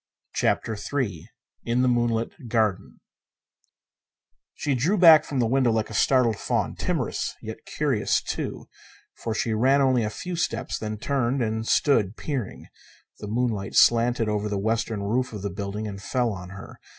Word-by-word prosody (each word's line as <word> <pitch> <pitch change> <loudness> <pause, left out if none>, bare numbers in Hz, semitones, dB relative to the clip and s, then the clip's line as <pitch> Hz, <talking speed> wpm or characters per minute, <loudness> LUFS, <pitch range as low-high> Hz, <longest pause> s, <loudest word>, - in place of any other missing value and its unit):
CHAPTER 110 - 0
III 105 - -3 0.3
In 120 +2 +1
a - - +3
Moonlit 120 +2 -1
Garden 110 -4 -1 1.5
She 145 - -1
drew 155 - +1
back 165 -4 +8
from 140 - -5
the 120 - +2
window 125 +1 +2
like 110 -1 -1
a - - -7
startled 120 0 +3
fawn; - - -1
timorous, - - -2
yet - - -9
curious, - - +1
too, - - -5 0.5
for 115 -2 -4
she 115 0 0
ran 130 +6 +3
only 130 -3 +3
a 105 - -1
few 180 +10 -5
steps, 115 -9 -2
then 110 0 -4
turned 130 +1 0
and 110 0 -2
stood 115 -8 +2
peering. 135 -9 -4 0.5
The 105 - -7
moonlight 110 -3 -2
slanted 120 -1 +4
over 105 0 -1
the 100 - -1
western 110 0 -1
roof 125 +4 -1
of 105 -2 -6
the 100 - -2
building 100 +3 -4
and 100 -2 -7
fell 120 +1 0
on 90 -2 -8
her. 100 +1 -11
115 Hz, 165 wpm, -25 LUFS, 105-130 Hz, 1.5 s, back